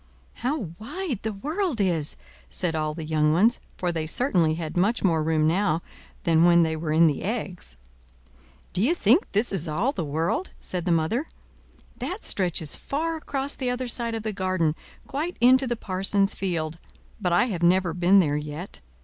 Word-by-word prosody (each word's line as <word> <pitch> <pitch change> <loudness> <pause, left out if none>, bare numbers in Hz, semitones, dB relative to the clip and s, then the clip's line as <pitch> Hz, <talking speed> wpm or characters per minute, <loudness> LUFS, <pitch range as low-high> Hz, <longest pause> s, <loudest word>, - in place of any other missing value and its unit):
"How 265 +6 0 0.2
wide 275 - -4
the 220 - -2
world 305 - -2
is!" 170 -7 +1 0.3
said 165 - -1
all 155 -1 -1
the 160 -1 -6
young 155 -1 +2
ones, 220 +8 +4 0.2
for 180 -1 -1
they 160 -2 -3
certainly 170 - +2
had 160 -2 -5
much 205 +7 +1
more 165 -5 +3
room 155 0 +1
now 170 -1 +1 0.4
than 165 -1 +4
when 170 0 +6
they 160 -1 0
were 155 0 -3
in 165 +2 +5
the 150 -4 +1
eggs. 185 - -4 1.0
"D'ye 230 - +2
think 260 - +3
this 210 +4 +2
is 180 -3 +1
all 185 - 0
the 230 - -3
world?" 160 - -1
said 180 -2 -4
the 180 - +1
mother. 170 - +1 0.7
"That 385 +5 -4
stretches 175 -5 0
far 325 +4 -2
across 280 -2 -3
the 255 -2 -3
other 250 +1 -2
side 235 -1 -3
of 220 - -4
the 215 -1 -2
garden, 185 -5 0 0.3
quite 310 +6 -3
into 260 +2 +6
the 240 - 0
parson's 195 -1 +1
field; 165 -4 -3 0.4
but 180 -3 0
I 175 +7 +4
have 175 - -4
never 175 0 +3
been 180 +3 +4
there 150 -6 +3
yet. 150 +5 -7
185 Hz, 180 wpm, -25 LUFS, 160-240 Hz, 1.0 s, when